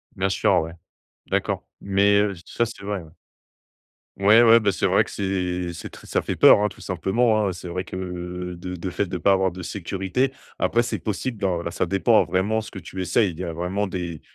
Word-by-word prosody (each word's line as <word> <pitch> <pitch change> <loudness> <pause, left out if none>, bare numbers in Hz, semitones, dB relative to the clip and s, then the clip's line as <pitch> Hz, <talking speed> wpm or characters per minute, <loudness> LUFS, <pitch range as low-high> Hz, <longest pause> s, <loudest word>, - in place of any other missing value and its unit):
Bien 95 +1 0
sûr, 95 - +3
ouais. 80 +1 -6 0.5
D'accord. - - -1
Mais 100 +1 +3
heu, 105 -1 0
ça, 115 - 0
c'est 110 -3 -9
vrai, 100 -1 -3
ouais. 80 -2 -14 1.1
Ouais, 105 +4 +6
ouais, 115 0 +7
bah, 105 -3 +1
c'est 85 - -1
vrai - - +3
que - - -11
c'est 90 -2 -2
c'est - - -8
très - - -14
ça - - 0
fait - - -3
peur, - - +7
hein, 105 - +3
tout - - -11
simplement, 105 +4 +1
hein. 95 - -1
C'est 90 0 -8
vrai 90 +2 -3
que, - - -8 0.6
de 90 +1 -5
de 90 +2 -4
fait, 95 - -1
de 90 0 -4
pas 95 +4 +3
avoir 95 -2 +2
de 90 - -8
sécurité. 95 +8 -2 0.3
Après, 120 +1 +2
c'est 115 -4 -3
possible 110 +6 -3
dans 95 -4 -1
là, 85 - -4
ça - - -1
dépend 100 +5 +3
vraiment 100 +4 0
ce 110 0 -8
que 95 - -7
tu 95 +2 -7
essayes, 95 +3 +2
il 80 - -12
y 90 - -3
a 85 - -4
vraiment 90 +5 -2
des 90 -4 -5
95 Hz, 225 wpm, -23 LUFS, 90-105 Hz, 1.1 s, ouais